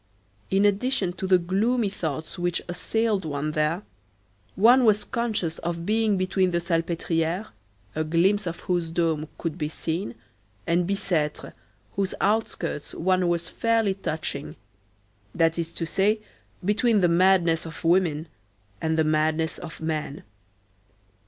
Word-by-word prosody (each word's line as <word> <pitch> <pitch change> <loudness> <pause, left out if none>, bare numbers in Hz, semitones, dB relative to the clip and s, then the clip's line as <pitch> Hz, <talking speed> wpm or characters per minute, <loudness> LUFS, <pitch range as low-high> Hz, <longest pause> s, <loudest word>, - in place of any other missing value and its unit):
In 195 +1 +3
addition 205 -2 +1
to 190 +2 -4
the 185 -1 +6
gloomy 205 +6 +1
thoughts 160 -2 -4
which 175 -1 0
assailed 210 +3 0
one 150 -1 -2
there, 155 +5 0 0.7
one 240 +6 +6
was 215 -2 +4
conscious 215 -9 -2
of 170 0 -3
being 215 -1 +2
between 185 0 +1
the 175 - 0
Salpêtrière, 170 +2 -1 0.4
a 155 - -1
glimpse 180 +5 +2
of 170 - -5
whose 175 -2 -1
dome 160 -2 0
could 165 0 -4
be 150 -1 -1
seen, 160 -4 -3 0.5
and 170 +2 +1
Bicêtre, 165 -6 -1 0.4
whose 195 -1 0
outskirts 195 -7 -1
one 185 +1 +2
was 170 -1 0
fairly 225 -3 +1
touching; 155 - -4 0.8
that 165 0 +2
is 165 0 -2
to 165 - -2
say, 200 +6 +2 0.5
between 215 +1 +3
the 175 - +5
madness 170 -2 +3
of 165 - -9
women 165 -2 +2 0.5
and 160 0 0
the 160 - +4
madness 155 +1 +1
of 160 -3 -9
men. 155 -2 -3
175 Hz, 135 wpm, -25 LUFS, 160-200 Hz, 0.8 s, the